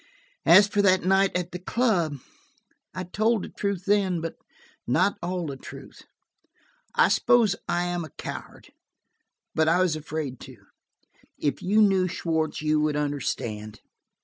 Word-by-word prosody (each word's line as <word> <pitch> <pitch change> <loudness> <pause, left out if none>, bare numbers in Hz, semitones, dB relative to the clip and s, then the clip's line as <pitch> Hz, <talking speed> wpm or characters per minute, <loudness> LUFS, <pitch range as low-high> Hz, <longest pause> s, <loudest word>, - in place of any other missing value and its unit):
"As 205 - +8
for 205 0 +1
that 185 -2 +3
night 195 +1 +3
at 180 -1 -4
the 180 - -6
club, 180 - 0 0.7
I 185 - -5
told 215 +4 0
the - - -7
truth 200 -3 -3
then, 200 -4 +2
but 165 0 -4 0.5
not 200 - +2
all 180 0 -3
the 140 -3 -5
truth. - - -12 0.9
I - - +5
suppose 225 -5 +3
I 175 - +1
am 175 -1 -2
a 160 - -8
coward, - - -9 0.8
but 160 0 +2
I 170 +2 +3
was 180 -4 +2
afraid 150 -4 -5
to. - - -11 0.8
If 140 -2 -2
you 210 +4 +3
knew 190 -3 +3
Schwartz, 160 -3 -2
you 155 0 +2
would 150 0 0
understand." 115 -7 -3
175 Hz, 150 wpm, -25 LUFS, 155-195 Hz, 0.9 s, As